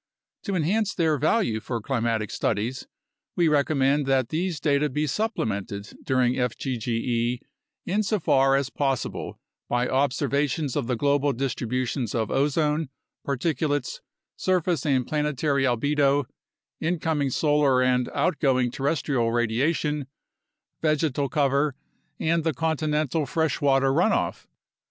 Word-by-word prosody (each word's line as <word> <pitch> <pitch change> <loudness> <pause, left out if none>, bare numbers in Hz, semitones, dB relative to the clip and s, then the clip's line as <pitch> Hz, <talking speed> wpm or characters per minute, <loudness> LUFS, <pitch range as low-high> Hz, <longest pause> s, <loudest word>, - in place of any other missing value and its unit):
To 200 -3 -1
enhance 200 +6 0
their 160 -4 +1
value 150 - +1
for 115 +2 -4
climatic 115 -3 -1
studies, 115 +5 -2 0.5
we 170 -2 +3
recommend 145 -1 +2
that 130 -3 +2
these 170 0 -2
data 150 0 +2
be 150 +3 -1
supplemented 105 - -3
during 130 -2 +2
fgge 120 -1 -1 0.5
insofar 180 -10 +2
as 135 -1 0
possible 135 -3 -2 0.3
by 120 +1 +1
observations 140 +1 0
of 140 -5 -1
the 125 - 0
global 140 +2 +2
distributions 125 -1 -2
of 110 -2 -1
ozone, 150 +1 +1 0.3
particulates, 145 - -1 0.4
surface 180 -5 0
and 130 -3 +2
planetary 150 -2 0
albedo, 140 +3 +2 0.5
incoming 160 -4 0
solar 145 -2 +3
and 125 -1 +1
outgoing 130 -8 +1
terrestrial 135 -4 0
radiation, 135 +5 0 0.7
vegetal 150 -3 +1
cover, 140 0 +1 0.4
and 165 0 +1
the 160 -3 0
continental 155 -1 0
freshwater 135 -3 +2
runoff. 180 +9 +1
140 Hz, 110 wpm, -25 LUFS, 125-155 Hz, 0.7 s, we